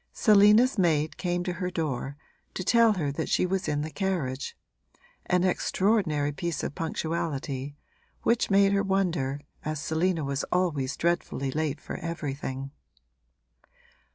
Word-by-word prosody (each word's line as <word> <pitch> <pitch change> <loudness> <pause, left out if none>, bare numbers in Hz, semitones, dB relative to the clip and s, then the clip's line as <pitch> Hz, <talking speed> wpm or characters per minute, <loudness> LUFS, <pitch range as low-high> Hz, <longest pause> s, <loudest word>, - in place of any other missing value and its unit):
Selina's 215 +3 +5
maid 155 -4 +2
came 175 -1 -1
to 180 0 -2
her 180 - 0
door 140 -5 -3 0.4
to 185 - -3
tell 230 +2 +5
her 155 -8 -1
that 140 - -3
she - - +2
was 190 0 -1
in 145 -1 0
the 155 - -5
carriage 150 -7 -2 0.7
an 180 0 +2
extraordinary 185 -5 +1
piece 170 +3 -3
of - - -3
punctuality, 145 -4 -3 0.5
which 235 0 +2
made 195 0 +5
her 200 - +3
wonder, 175 -9 0 0.2
as 155 -1 -3
Selina 160 +2 0
was 140 0 -2
always 160 -7 0
dreadfully 170 -5 -1
late 155 0 -1
for - - -6
everything. 140 -5 -4
165 Hz, 135 wpm, -27 LUFS, 145-190 Hz, 0.7 s, Selina's